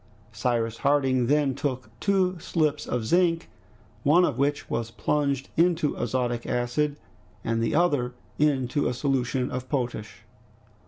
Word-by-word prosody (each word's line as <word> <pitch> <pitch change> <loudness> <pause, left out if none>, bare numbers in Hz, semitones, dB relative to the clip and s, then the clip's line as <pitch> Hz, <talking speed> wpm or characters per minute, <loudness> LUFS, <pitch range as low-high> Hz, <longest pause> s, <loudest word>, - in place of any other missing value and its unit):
Cyrus 115 0 -1
Harding 135 -3 +2
then 145 -1 +2
took 130 -1 -3
two 185 -3 +1
slips 155 -2 0
of 120 -3 -1
zinc, 170 +3 +2 0.5
one 170 +5 +5
of 125 - -2
which 145 +1 0
was 115 -1 -2
plunged 140 +1 -1
into 165 -3 +2
azotic 120 0 -1
acid, 125 +5 0 0.5
the 115 0 0
other 145 -8 +2 0.2
into 140 -2 +2
a 125 - -1
solution 130 -1 0
of 125 0 -5
potash. 120 -6 -3
135 Hz, 125 wpm, -26 LUFS, 120-150 Hz, 0.5 s, one